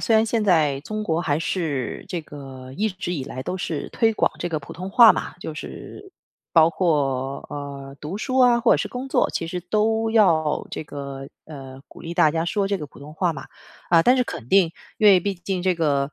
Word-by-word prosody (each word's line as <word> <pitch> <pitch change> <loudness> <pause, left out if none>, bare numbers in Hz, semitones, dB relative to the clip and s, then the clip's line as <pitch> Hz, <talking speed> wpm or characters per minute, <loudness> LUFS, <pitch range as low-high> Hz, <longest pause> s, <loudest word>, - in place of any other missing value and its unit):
虽 225 - +2
然 220 0 +5
现 225 -1 0
在 155 -8 +3
中 215 +7 -5
国 165 -4 0
还 150 -4 0
是 155 -8 -3
这 175 - -3
个 135 -3 -10
一 215 +5 +1
直 185 -3 -5
以 145 -7 -3
来 130 - -6
都 185 - -4
是 165 -4 -4
推 225 -1 +2
广 - - +1
这 175 - -3
个 160 -3 -2
普 140 - -11
通 185 +3 -6
话 230 +2 +8
嘛， - - -5
就 160 - -5
是 385 - -9 0.4
包 165 -1 +6
括， 140 -6 -1
呃， 140 -1 -7
读 155 +6 -5
书 255 +4 -1
啊， 245 -2 +5
或 235 - +4
者 - - +4
是 - - -2
工 255 +2 -6
作， - - +2
其 165 - -3
实 180 +1 -4
都 220 +4 0
要 165 -9 +3
这 - - -5
个， 140 -2 -7 0.2
呃， 135 -3 -10
鼓 - - -14
励 170 +1 -6
大 155 - +4
家 165 +2 -1
说 195 +2 -1
这 200 -1 0
个 150 - -6
普 140 - -17
通 145 +2 -10
话 175 +1 0
嘛。 140 - -9 0.4
啊， 165 -1 +6
但 250 - +5
是 255 - +3
肯 115 - -7
定， 190 -1 +4 0.3
因 215 - +4
为 190 - +7
毕 200 +2 -2
竟 180 +1 -4
这 185 -1 +2
个， 145 -3 0
165 Hz, 245 characters per minute, -23 LUFS, 145-205 Hz, 0.4 s, 话